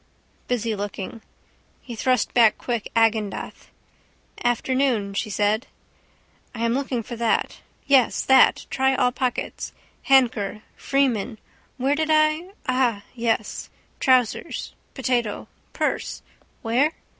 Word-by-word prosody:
Busy 230 -3 -1
looking. 205 +2 -6 0.6
He 240 - -9
thrust 255 0 +1
back 230 -3 +5
quick 235 -4 -3
Agendath. 225 -3 0 0.7
Afternoon 240 -3 +1
she 205 - -2
said. 210 +4 0 0.9
I 230 0 -1
am 230 - +1
looking 260 -3 -2
for 235 - -7
that. 230 -1 0 0.3
Yes, 270 -3 +3
that. 265 - +5
Try 265 0 +2
all 250 -1 +2
pockets. 250 -1 -3 0.4
Handker. 235 -6 +3
Freeman. 250 -5 0 0.4
Where 270 +2 +1
did 315 +1 -1
I? 310 +3 +3 0.2
Ah, 250 -5 +1
yes. 230 -3 -2 0.3
Trousers. 255 -4 +1 0.2
Potato. 245 -5 -1 0.2
Purse. - - -2 0.4
Where? 255 +7 +2
240 Hz, 110 wpm, -23 LUFS, 220-265 Hz, 0.9 s, back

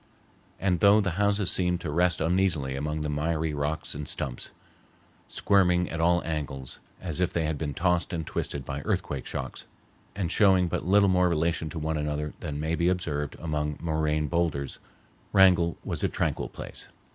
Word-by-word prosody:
And 95 -3 +1
though 100 +4 +6
the 100 -3 0
houses 100 -2 +2
seemed 90 -1 +1
to 80 - -3
rest 90 +2 +2
uneasily 85 -6 +1
among 75 +2 -2
the 75 - -1
miry 80 +1 -1
rocks 75 +2 -2
and 75 0 -6
stumps, 60 - -3 0.8
squirming 90 -3 +2
at 80 - -2
all 85 +1 +3
angles 70 -5 -4 0.2
as 85 -3 -3
if 90 - +1
they 85 - 0
had 80 0 -1
been 75 -4 -3
tossed 90 0 +1
and 80 -3 -3
twisted 70 -2 -3
by 70 +1 -4
earthquake 70 -1 -2
shocks, - - -5 0.5
and 95 -5 -2
showing 95 -3 +4
but 85 - -3
little 100 +1 +5
more 90 -1 +3
relation 80 -1 0
to 80 - -7
one 80 0 -1
another 75 0 -2
than 75 -1 -4
may 80 +2 -1
be 85 +1 +2
observed 75 -6 -2
among 75 -2 -2
moraine 75 -2 0
boulders, 75 -3 -1 0.5
Wrangell 90 -3 +5
was - - -3
a - - +2
tranquil - - -1
place. - - -7
80 Hz, 175 wpm, -27 LUFS, 75-90 Hz, 0.8 s, though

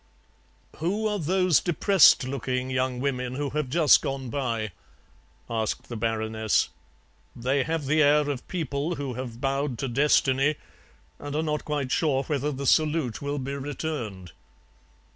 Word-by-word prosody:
"Who 195 +7 -1
are 210 -1 0
those 180 0 +3
depressed 180 -1 +5
looking 130 0 -3
young 130 -1 -1
women 125 -2 -2
who 145 0 -2
have 150 -3 -2
just 155 +1 +5
gone 135 -3 -4
by?" 115 -6 -2 0.8
asked 110 -2 -3
the 120 - -5
Baroness; 110 -1 0 0.7
"they 130 +4 0
have 160 +1 -2
the 155 +3 +3
air 150 0 +4
of 140 -4 -4
people 160 -1 -2
who 140 -4 -4
have 120 -1 -6
bowed 135 -1 -1
to 135 - -2
destiny 135 +2 +2 0.6
and 145 0 -6
are 155 - 0
not 150 -1 -2
quite 145 -4 -2
sure 140 -4 +1
whether 145 0 -1
the 140 0 -5
salute 150 -5 +2
will 145 0 -2
be 135 0 -4
returned." 135 - -5
140 Hz, 145 wpm, -26 LUFS, 125-150 Hz, 0.8 s, depressed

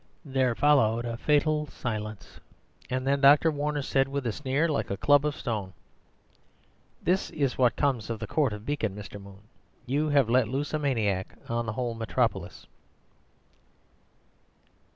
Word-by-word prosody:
There 130 -3 +1
followed 120 -5 +3
a 115 -1 -3
fatal 150 +3 +1
silence; 110 -6 -6 0.5
and 130 0 -2
then 140 +1 +1
Dr. 145 +3 +6
Warner 145 -1 -2
said, 135 0 +1
with 140 -1 -4
a 115 - 0
sneer 140 +6 0
like 155 - -1
a 100 - -2
club 145 +4 +4
of 150 - -2
stone,— 105 -6 -4 1.3
"This 185 +3 +1
is 140 -4 -1
what 125 -2 +3
comes 130 -8 0
of 115 - -2
the 110 - -4
Court 140 +2 +1
of 105 +1 -7
Beacon, 120 -9 -2
Mr. 105 0 -9
Moon. 100 0 -13 0.4
You 145 +4 0
have 140 -5 +3
let 125 0 +3
loose 140 +6 -3
a 155 - +1
maniac 110 -10 -1
on 115 0 -2
the 110 - -2
whole 120 0 -2
metropolis." 115 -1 -2
130 Hz, 155 wpm, -27 LUFS, 110-145 Hz, 1.3 s, Dr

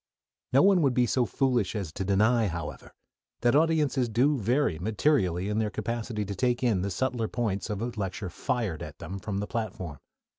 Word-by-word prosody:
No 135 - +5
one 195 -2 +5
would 135 -5 +2
be 125 - +4
so 120 +1 +1
foolish 125 -7 +1
as 95 -7 -3
to 95 - -4
deny, 110 +4 +3
however, 85 -4 -6 0.5
that 120 +2 +3
audiences 150 -5 +2
do 130 +7 +3
vary 120 - +1
materially 100 - +1
in 105 +1 0
their 110 -1 0
capacity 115 -1 -3
to 100 - -4
take 125 +3 0
in 110 -7 +2
the 100 - -1
subtler 115 +3 -1
points 110 -4 -2
of 105 +1 -2
a 120 - -2
lecture 95 -2 -4
"fired" 110 - -2
at - - -8
them 100 +1 -6
from 100 0 -4
the 100 - -1
platform. 95 - -4
110 Hz, 190 wpm, -28 LUFS, 100-125 Hz, 0.5 s, No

